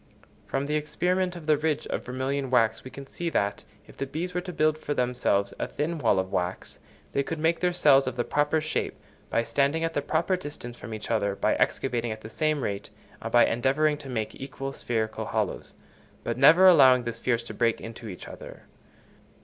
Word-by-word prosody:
From 135 +1 -1
the 150 - -2
experiment 180 +4 0
of 170 -3 -9
the 155 -1 +4
ridge 155 0 -1
of - - -3
vermilion 130 +2 -2
wax 115 -3 +2
we 130 - -8
can 140 +1 -9
see 170 +5 -4
that, 100 -9 -1 0.2
if - - -17
the 135 - -3
bees 170 +6 -4
were 180 - -1
to 180 0 -6
build 155 -2 +1
for 145 -1 -3
themselves 120 -5 +1
a - - -1
thin 160 +3 -3
wall 115 -7 +3
of 95 0 -1
wax, 90 +1 -3 0.3
they 140 - +1
could 165 +4 -4
make 160 +2 +1
their 180 0 +2
cells 140 -6 +4
of 130 - -2
the 120 - 0
proper 150 +4 +1
shape, 155 +1 -2 0.3
by 115 - +1
standing 140 +6 +1
at 165 0 -1
the 145 - 0
proper 165 +6 +1
distance 145 -8 -8
from 120 - -9
each 110 +1 -6
other, 100 -3 +1
by - - +1
excavating 120 -1 0
at 110 0 -6
the 110 - -10
same 155 +1 0
rate, 100 -1 -3 0.3
and - - -5
by 120 - +6
endeavouring 140 +6 +2
to 140 -3 -9
make 110 -4 -3
equal 135 0 -5
spherical 110 -4 -2
hollows, - - -3 0.5
but - - -2
never 160 +8 +7
allowing 130 -8 +7
the 120 0 -3
spheres 120 -1 -1
to - - -8
break 115 -2 +1
into 115 0 -8
each 90 -4 -8
other. - - -10
135 Hz, 210 wpm, -27 LUFS, 115-155 Hz, 0.5 s, never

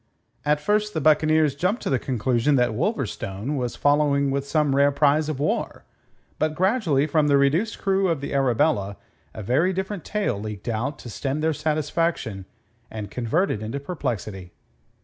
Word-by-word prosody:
At 150 0 +2
first 210 +5 0
the - - +1
buccaneers 155 0 +3
jumped 180 - -1
to - - -2
the 130 - +2
conclusion 125 +2 +1
that 125 -2 +2
Wolverstone 120 - -2
was 125 -3 -2
following 145 -1 +2
with 140 0 -2
some 150 -2 +1
rare 140 +1 +4
prize 150 +2 +2
of 145 -4 -3
war, 150 - -2 0.6
but 155 0 0
gradually 185 - +2
from 155 0 +2
the 140 -1 +4
reduced 155 +11 +1
crew 195 0 +1
of 165 -5 0
the 140 - -5
Arabella 125 -6 +1 0.4
a 110 - -6
very 145 - +2
different 190 -1 -4
tale 205 - -2
leaked 105 0 -7
out 120 +5 -2
to 120 - -10
stem 140 +6 -3
their 160 0 +1
satisfaction 150 - -1 0.4
and 105 -2 -7
convert 140 - 0
it 105 - -3
into 110 +6 -4
perplexity. 110 - -5
145 Hz, 170 wpm, -24 LUFS, 125-160 Hz, 0.6 s, rare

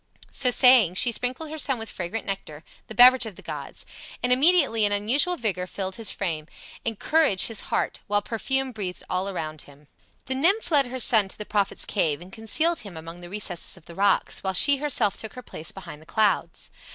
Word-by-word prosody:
So 255 - +2
saying 245 -8 +5
she 240 +5 +4
sprinkled 255 +7 -3
her 315 - -6
son 270 -3 0
with 225 0 -6
fragrant 185 +4 -5
nectar, 165 -6 -6 0.2
the 220 - -9
beverage 250 +1 +7
of 210 - -9
the - - -14
gods, - - -7 0.4
and 250 0 +4
immediately 275 -5 +3
an 205 - +2
unusual 250 - +2
vigor 185 -6 -3
filled 190 0 -5
his 225 -4 0
frame, 160 -6 -4 0.4
and 225 -2 -3
courage 300 -11 +3
his 225 -2 -2
heart, - - -1
while 205 0 0
perfume 265 +5 -1
breathed 195 -6 -6
all 185 +2 -1
around 155 -5 -6
him. 145 +1 -18 0.4
The 260 - -2
nymph 350 +8 +1
led 280 -4 +3
her 255 +1 -6
son 220 -4 +4
to - - -11
the 210 - -7
prophet's 200 -2 0
cave 155 -8 0
and 180 +2 -14
concealed 315 +10 0
him 195 -6 -10
among 165 +2 -10
the 175 - -10
recesses 190 -3 -3
of 175 - -19
the 170 - -12
rocks, 200 +2 +1
while 190 -1 -3
she 285 +8 +6
herself 265 -8 0
took 220 - -7
her 250 - -9
place 160 -7 -5
behind 170 -6 -11
the 160 - -18
clouds. 215 -2 -1
215 Hz, 210 wpm, -24 LUFS, 185-255 Hz, 0.4 s, beverage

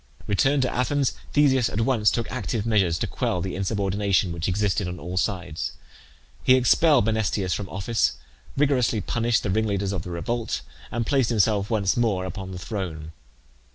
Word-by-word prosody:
Returned 135 +7 +2
to 125 - -1
Athens, 135 +2 +1 0.2
Theseus 135 -5 +4
at 110 - -2
once 115 -3 +3
took 115 - -1
active 120 -4 -2
measures 95 -7 +2
to - - -1
quell 90 - -1
the 90 +1 -3
insubordination 100 -1 0
which 85 -1 -3
existed 100 0 0
on 90 0 -6
all 90 +2 -6
sides. 90 -4 -2 0.7
He 130 - +6
expelled 130 +1 +4
Menesthius 110 -4 0
from 100 -2 -4
office, 105 +4 0 0.4
rigorously 130 -6 +2
punished 120 +2 0
the 100 - -1
ringleaders 100 -2 0
of 95 -4 -2
the 90 - -8
revolt, 85 - -2 0.3
and 115 0 -1
placed 135 -1 +2
himself 105 -3 +2
once 100 -5 +1
more 105 -6 +1
upon 95 0 -6
the 95 - -6
throne. 90 -6 -5
105 Hz, 165 wpm, -24 LUFS, 95-120 Hz, 0.7 s, He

